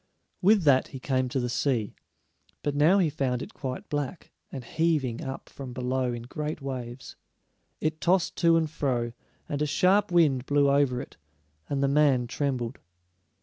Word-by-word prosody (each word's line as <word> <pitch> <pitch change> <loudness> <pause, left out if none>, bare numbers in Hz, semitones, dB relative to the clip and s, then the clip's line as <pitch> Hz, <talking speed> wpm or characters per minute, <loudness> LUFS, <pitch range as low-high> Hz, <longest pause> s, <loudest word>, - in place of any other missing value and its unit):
With 200 0 +5
that 135 -3 +4
he 135 - -8
came 130 -1 0
to 130 - -1
the 125 - -1
sea, 120 -4 0 0.7
but 145 - 0
now 155 +7 +4
he 185 -4 +3
found 130 -4 -1
it - - -10
quite 130 -2 -5
black, 145 +3 -4 0.2
and 130 - -6
heaving 145 -4 0
up 135 0 -6
from 130 -3 -8
below 125 0 -1
in 120 -1 -5
great 150 +5 -4
waves. 130 -2 -6 0.6
It 155 0 -2
tossed 180 0 +2
to 170 -1 +4
and 160 -1 +1
fro, 125 -6 -1 0.3
and 145 0 -3
a 150 - +1
sharp 190 +6 +3
wind 145 -7 +3
blew 145 -1 +3
over 140 -3 +2
it, - - -12 0.5
and 140 -1 0
the - - +3
man 140 -3 +3
trembled. 125 -1 -2
140 Hz, 170 wpm, -27 LUFS, 125-150 Hz, 0.7 s, With